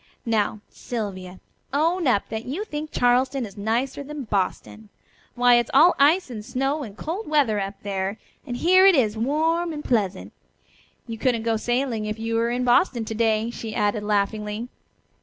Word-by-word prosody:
"Now, 215 -2 0
Sylvia, 190 -6 -6 0.3
own 325 +4 +1
up 205 -6 +1
that 220 +1 -5
you 320 +12 -4
think 305 -5 -5
Charleston 255 +1 +2
is 200 -2 -11
nicer 230 +7 -1
than 295 0 -7
Boston. 210 +1 -3 0.5
Why, 245 0 +5
it 240 - 0
is - - -12
all 330 +6 +7
ice 300 +2 +4
and 215 -3 -6
snow 270 +6 -1
and 215 -6 -8
cold 365 +8 -4
weather 275 -9 +2
up 195 0 -4
there, 195 0 -3 0.3
and 245 -3 -5
here 370 +6 +5
it 385 - +6
is 225 -6 +2
warm 320 +8 0
and 300 -1 -7
pleasant. 200 -6 -1 0.7
You 225 -2 -7
couldn't 240 -2 +1
go 225 -1 +1
sailing 240 -1 -1
if 215 +1 -3
you 225 +1 -3
were 230 +1 +1
in 245 +1 -1
Boston 245 -1 +2
to 220 - -4
day," 225 0 +1
she 225 -2 -7
added 205 0 0
laughingly. 210 +2 -1
235 Hz, 175 wpm, -24 LUFS, 215-280 Hz, 0.7 s, all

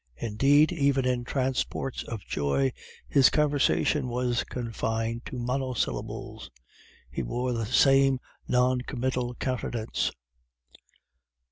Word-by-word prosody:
Indeed, 135 +8 +3
even 140 -5 +2
in 125 -1 0
transports 130 0 -2
of 115 -4 -7
joy, 70 -2 0 0.3
his 135 -3 +5
conversation 145 -1 +2
was 120 -1 0
confined 115 -1 -3
to 130 - -6
monosyllables; 125 0 -3 0.6
he - - -3
wore 125 - -2
the 115 -2 -2
same 135 +1 +4 0.3
non 125 0 +2
committal 125 -1 -2
countenance. 120 -3 -2
125 Hz, 100 wpm, -27 LUFS, 115-135 Hz, 0.6 s, his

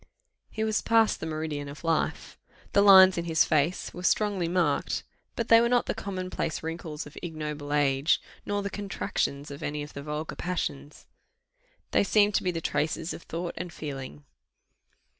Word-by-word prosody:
He 220 - -3
was 220 0 +1
past 225 -1 +3
the 160 - -4
meridian 155 -2 -3
of 145 +3 -10
life. 165 -1 -1 0.3
The 200 - +5
lines 190 -2 +8
in 170 - -3
his 160 -2 +3
face 155 +3 0
were 180 - -7
strongly 195 -1 +1
marked; 170 -4 0 0.3
but 230 - -2
they 230 0 +8
were 235 - +2
not 245 0 +3
the - - -1
common 185 -4 -5
place 160 - -3
wrinkles 160 -2 -5
of 150 - -13
ignoble 150 -3 -5
age, 145 0 +3 0.2
nor 205 0 -2
the 200 - -3
contractions 150 -8 -3
of 140 - -8
any 150 0 -3
of 150 - -10
the 140 - -6
vulgar 150 +2 -4
passions: 155 -5 -4 0.9
they - - +4
seemed 205 0 +3
to - - +1
be 185 - +1
the 165 -2 -2
traces 160 +2 -1
of - - -8
thought 170 +1 -5
and 175 +1 -5
feeling. 135 - -7
165 Hz, 180 wpm, -28 LUFS, 150-195 Hz, 0.9 s, lines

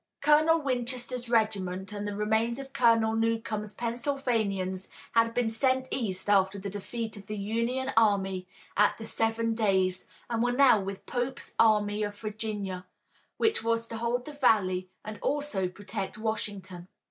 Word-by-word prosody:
Colonel 305 +3 +5
Winchester's 250 -2 -2
regiment 195 -4 0
and 205 0 -4
the 205 - -3
remains 220 +3 +1
of 270 -1 -8
Colonel 230 -2 +4
Newcomb's 225 -2 -1
Pennsylvanians 230 -7 -1 0.2
had 230 0 +3
been 245 -2 +2
sent 260 +3 +1
east 200 -8 -2
after 195 -1 +3
the 200 0 -5
defeat 220 +2 -5
of 200 -1 -12
the 215 - -4
Union 230 +6 -1
army 195 -4 +2 0.3
at 210 +1 +4
the 220 - -7
Seven 225 +1 0
Days, 190 -4 +1 0.2
and 230 -1 -1
were 245 +1 +2
now 255 -4 +6
with 195 0 -6
Pope's 245 +1 -4
Army 210 -2 +4
of 205 -1 -3
Virginia, 210 -4 -4 0.5
which 440 - +1
was 230 0 +1
to 225 - -5
hold 240 +2 -1
the 300 - -7
valley 185 -9 +2 0.2
and 215 0 -6
also 285 -10 -1
protect 200 +2 -6
Washington. 205 -5 -4
220 Hz, 150 wpm, -29 LUFS, 200-240 Hz, 0.5 s, now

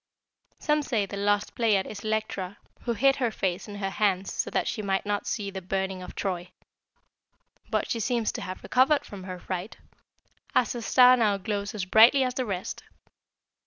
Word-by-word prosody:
"Some 300 0 +1
say 230 -8 0
the 200 - -7
Lost 205 +1 0
Pleiad 210 -5 +2
is 205 - -7
Electra, 215 -3 -2 0.3
who 235 - +1
hid 270 +5 +3
her 245 -3 +1
face 190 -3 -2
in 205 - -8
her 195 -1 -3
hands 195 -2 0
so - - -2
that - - 0
she 215 - -2
might 195 -1 -1
not 205 0 -2
see 205 -3 -2
the 190 -1 -6
burning 190 0 -2
of 180 - -9
Troy. 180 -2 -3 1.2
But - - -1
she 230 - 0
seems 235 0 0
to - - -6
have 185 - -6
recovered 270 +4 +3
from 195 -2 -9
her 185 -1 -6
fright, 185 +3 -5 0.8
as 240 - +3
her 240 - -5
star 250 +2 +6
now 215 -5 +2
glows 200 +2 -3
as 195 -3 -2
brightly 230 +8 +6
as 255 -1 -1
the 255 -1 -2
rest. 190 -3 -4
205 Hz, 190 wpm, -27 LUFS, 190-235 Hz, 1.2 s, star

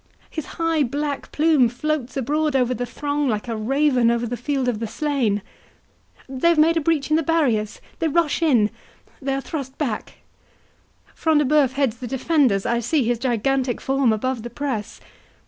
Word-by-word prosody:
—His 315 -4 -5
high 330 -2 +1
black 285 +2 -2
plume 300 -6 +3
floats 275 +1 -3
abroad 295 +3 0
over 255 -1 +2
the 245 0 -3
throng, 285 +3 -2
like 215 +1 -2
a 230 - -2
raven 255 +2 +2
over 235 0 +1
the 240 +1 -3
field 265 +2 -2
of 235 -4 0
the 225 - -3
slain.—They 260 +2 -4
have 340 - +3
made 320 +2 +5
a 325 - +1
breach 310 -1 0
in 310 - +5
the - - +2
barriers—they 295 - -1
rush 325 0 +1
in—they 270 0 -1
are 275 - -2
thrust 270 -3 -6
back!—Front 300 +4 -5
de 295 - +3
Bœuf 275 -4 +4
heads 270 -5 0
the 250 - -6
defenders; 260 - +1
I 235 0 +1
see 260 +5 +1
his 235 0 0
gigantic 255 +1 0
form 270 -3 +1
above 245 +3 -1
the 240 - -6
press. 235 -4 -4
270 Hz, 165 wpm, -22 LUFS, 240-300 Hz, -, made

